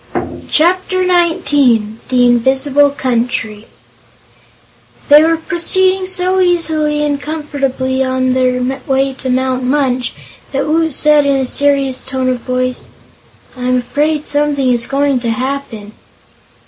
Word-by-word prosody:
Chapter 370 +3 +1
Nineteen 290 - +1
The 250 -1 +3
Invisible 265 +4 +2
Country 235 -5 -3 1.4
They 295 +1 +8
were 325 +1 +2
proceeding 370 +2 0
so 370 0 0
easily 315 -4 +1
and 290 -1 -1
comfortably 275 -4 -2
on 260 0 0
their 255 -1 0 0.2
way 270 0 0
to 260 0 -6
Mount 255 0 0
Munch 255 -2 -1 0.4
that 275 +1 -1
Woot 320 +1 0
said 300 0 +3
in 280 - +2
a 265 -1 0
serious 275 -1 0
tone 260 -1 -2
of 250 -1 -1
voice: 255 +1 -3 0.7
"I'm 250 0 -1
afraid 290 +5 -1
something 290 -2 0
is 240 -1 0
going 275 -1 0
to 235 -1 -3
happen." 250 -3 -4
275 Hz, 120 wpm, -14 LUFS, 255-300 Hz, 1.4 s, They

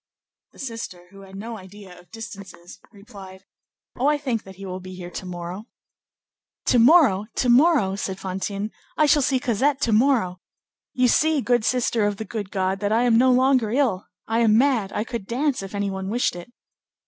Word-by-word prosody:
The - - -20
sister, 225 -9 -7
who 195 0 -14
had 195 0 -13
no 225 +3 -7
idea 190 -1 -13
of 175 - -20
distances, 200 -6 -10
replied, 195 -2 -13 0.5
"Oh, 260 - 0
I 295 0 +3
think 255 -6 -2
that 190 0 -12
he 195 +1 -10
will 185 0 -5
be 185 0 -10
here 175 -1 -8
to 190 - -7
morrow." 175 +3 -6 1.0
"To 245 - +3
morrow! 235 - +5
to 250 - +1
morrow!" 255 - +4
said 195 -1 -4
Fantine, 195 +2 -4 0.3
"I 310 - +4
shall 295 0 +4
see 265 -1 +1
Cosette 265 +3 0
to 230 - +1
morrow! 215 -7 +2 0.5
you 255 -1 +3
see, 310 +5 +3
good 245 -3 +1
sister 235 -3 +1
of 205 -1 -3
the 220 - -5
good 205 -1 -5
God, 190 -1 -1
that 205 0 -1
I 230 +2 +3
am 235 -2 +4
no 255 +1 +5
longer 255 -2 +3
ill; 235 -6 0 0.2
I 225 +1 0
am 220 -2 +4
mad; 240 -7 +2
I 210 - -2
could 230 -4 -6
dance 270 +2 -1
if 195 +1 -8
any 200 -1 -1
one 190 0 -5
wished 235 -3 0
it." 175 +7 -10
215 Hz, 195 wpm, -23 LUFS, 190-250 Hz, 1.0 s, morrow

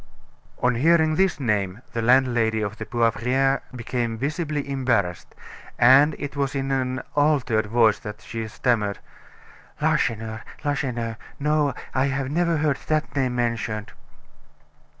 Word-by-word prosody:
On 125 0 +4
hearing 160 +5 +3
this 190 +1 +1
name, 105 -3 -1
the 115 - -1
landlady 120 -2 +3
of 105 +1 -3
the 110 - -5
Poivriere 130 +3 +1
became 115 -1 -2
visibly 150 +2 -2
embarrassed, 120 -10 -1 0.4
and 135 +5 +6
it 140 0 -6
was 140 -1 -1
in 135 0 -2
an 130 -1 -1
altered 135 -7 +2
voice 110 -1 +3
that 105 0 -8
she 115 -1 -5
stammered: 105 -3 0 0.8
"Lacheneur! 110 -2 0 0.2
Lacheneur! 120 -6 -2 0.2
no, 150 -1 +1 0.2
I 130 +1 +2
have 135 -1 -2
never 170 +1 +1
heard 150 -3 +1
that 155 -1 -1
name 130 -3 0
mentioned." 115 -3 -2
125 Hz, 130 wpm, -24 LUFS, 115-140 Hz, 0.8 s, and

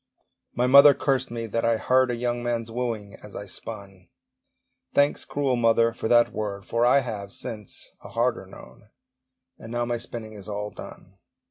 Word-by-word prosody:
My 125 - +2
mother 140 +2 +8
cursed 135 -2 0
me 115 -1 -4
that 115 +1 -2
I 115 -1 +2
heard 130 +3 +3
A 120 - -1
young 120 0 -2
man's 115 -1 -2
wooing 115 -4 -3
as - - -12
I - - -6
spun: 95 -3 -9 0.9
Thanks, 145 0 +2
cruel 140 -3 0
mother, 115 -1 +3
for 110 - -4
that 120 0 +4
word, 100 -2 -4
For 120 +1 +1
I 140 +3 +5
have, 105 -5 -5
since, 110 -4 -8
a - - -10
harder - - -1
known! 65 +12 -15 0.7
And 115 - -10
now 120 0 -1
my 120 0 -2
spinning 110 -2 -7
is 100 -2 -10
all 105 0 -4
done. 95 +1 -12
115 Hz, 175 wpm, -25 LUFS, 105-125 Hz, 0.9 s, mother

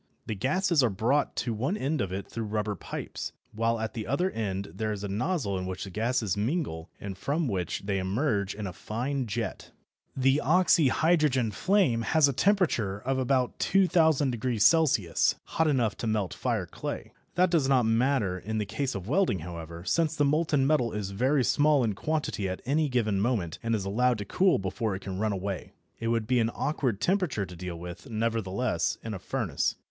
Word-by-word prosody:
The - - -3
gases 155 - +2
are 125 - +3
brought 120 +9 +1
to 120 - -1
one 130 - -1
end 150 0 -1
of 95 -2 -2
it 95 +1 -4
through 115 -1 -4
rubber 105 0 -1
pipes, 95 - -6 0.2
while 115 +1 0
at 110 0 -3
the 110 -3 -5
other 180 +7 +1
end 100 -3 -3
there 110 +3 -2
is 105 -1 -4
a - - -2
nozzle 105 - -1
in 90 - -4
which 95 0 -4
the 95 - -7
gases 110 0 0
mingle 105 - -2
and 100 -1 -6
from 145 - -1
which 90 -5 -2
they 100 -1 0
emerge 100 0 0
in 105 0 -5
a 90 - -5
fine 125 +8 -3
jet. 115 +2 -4 0.5
The 135 +2 +3
oxyhydrogen 155 -5 +3
flame 180 - +2
has 155 +5 +4
a 140 - 0
temperature 155 - +2
of 130 +5 -1
about 130 -1 +1
2000° 155 - +3
C., 90 -9 +1
hot 160 - 0
enough 125 -7 +1
to 115 - -3
melt 105 -4 0
fire - - -1
clay. - - -6 0.2
That 180 0 +3
does 150 -6 +2
not 130 -3 +4
matter 115 -5 +1
in 110 +4 -4
the 105 - 0
case 135 +5 -2
of 95 -1 -5
welding, 175 - +2
however, 85 0 -7
since 160 +4 +1
the 145 - +2
molten 150 -1 +2
metal 135 -6 +2
is 105 -2 -3
very 130 +7 +2
small 145 +2 +3
in 110 -3 +1
quantity 145 -5 -2
at 95 - -5
any 150 +3 +1
given 110 -6 +1
moment, 105 -8 -1
and 115 0 0
is 100 -3 -3
allowed 120 +5 +2
to 105 - -5
cool 185 - +3
before 95 +2 -2
it 95 - -8
can 95 -1 -5
run 110 0 +1
away. 100 -1 -4 0.3
It 115 - -3
would 115 -1 +1
be 125 +2 +2
an 115 -1 +2
awkward 130 -8 -1
temperature 180 - +1
to 90 - -10
deal 90 0 -6
with, 90 +6 -9
nevertheless, 110 -4 -1
in 110 - -4
a 95 - -5
furnace. - - -1
115 Hz, 195 wpm, -28 LUFS, 100-145 Hz, 0.5 s, has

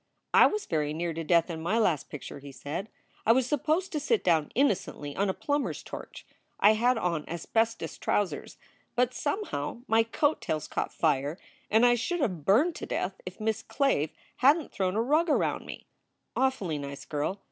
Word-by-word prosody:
"I - - +8
was 425 0 -2
very 150 -3 -1
near 170 +1 -2
to 165 +1 -4
death 170 +2 +3
in 160 -1 -5
my 195 +7 +1
last 180 -10 +1
picture," 145 -1 -8
he 140 0 -10
said. 145 +10 -5 0.3
"I 225 - +5
was 260 0 +2
supposed 310 +7 0
to 305 - -1
sit 425 +9 +1
down 160 -4 +2
innocently 190 - 0
on 200 0 +1
a - - +1
plumber 290 -1 0
s - - -7
torch. - - -9 0.3
I 210 +2 +7
had 240 +3 +2
on 170 -7 -1
asbestos 225 +7 -1
trousers, 205 -3 -1 0.4
but 250 0 +2
somehow 285 - -3
my 225 +1 +5
coat 285 +7 +1
tails 155 -1 -2
caught - - -2
fire 145 0 0 0.3
and 220 +3 +5
I 240 - +6
should 250 +10 -1
have 180 - -1
burned 285 - +4
to - - -6
death 190 +1 -3
if 185 - -7
Miss 220 0 -1
Clave 225 - +1 0.3
hadn 290 +5 +5
t - - -13
thrown 185 -1 -1
a 220 - +2
rug 310 +7 +2
around - - +1
me. - - -8 0.5
Awfully 205 - 0
nice 140 0 -7
girl. 150 +7 -2
210 Hz, 190 wpm, -29 LUFS, 160-260 Hz, 0.5 s, I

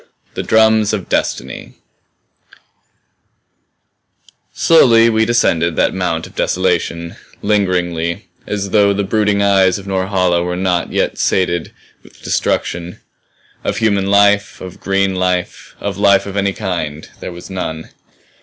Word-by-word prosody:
"THE - - -3
DRUMS 110 -1 +3
OF 100 -4 -4
DESTINY" 65 +1 -3 2.8
Slowly 115 -8 +5
we 110 0 +2
descended 85 -8 +1
that - - +1
mount - - -2
of - - -14
desolation; 85 -2 -1 0.3
lingeringly, 90 -5 -1 0.2
as 100 -2 -3
though 100 -2 +4
the 100 +1 -1
brooding 105 0 +1
eyes 95 -2 +3
of 100 - -10
Norhala 95 -2 0
were 90 0 -3
not 90 -2 -1
yet - - -1
sated 85 -3 0 0.3
with - - -20
destruction. 90 0 -2 0.7
Of 100 - -2
human 100 -4 +1
life, 100 +1 +3
of 95 -2 -10
green 95 0 0
life, 90 -1 -2
of - - -4
life 100 -1 +4
of 100 -1 -7
any 100 -1 0
kind 85 -7 -4
there - - -6
was 85 +2 -10
none. 80 -4 -5
95 Hz, 125 wpm, -16 LUFS, 90-100 Hz, 2.8 s, Slowly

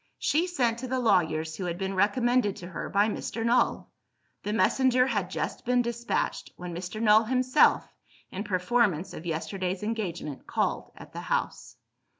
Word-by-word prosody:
She 315 +5 +1
sent 240 -9 0
to 255 - -5
the 260 +1 -1
lawyers 160 -8 +1
who 185 - -4
had 175 -1 -3
been 190 +1 -3
recommended 210 +2 +2
to 175 - -9
her 180 - -6
by 200 +2 +3
Mr. 225 +1 -3
Null. 240 +2 +1 0.5
The 210 - -3
messenger 250 +3 +3
had 205 -8 -1
just - - -4
been 250 0 +2
despatched, 235 0 -2
when 175 -1 -7
Mr. 180 +5 -5
Null 220 0 +5
himself, 255 +4 +3 0.4
in 195 - -4
performance 195 -2 +1
of 170 - -8
yesterday's 185 +3 -3
engagement, 180 -10 -4
called - - -1
at - - -13
the - - -5
house. - - -3
210 Hz, 160 wpm, -28 LUFS, 180-240 Hz, 0.5 s, Null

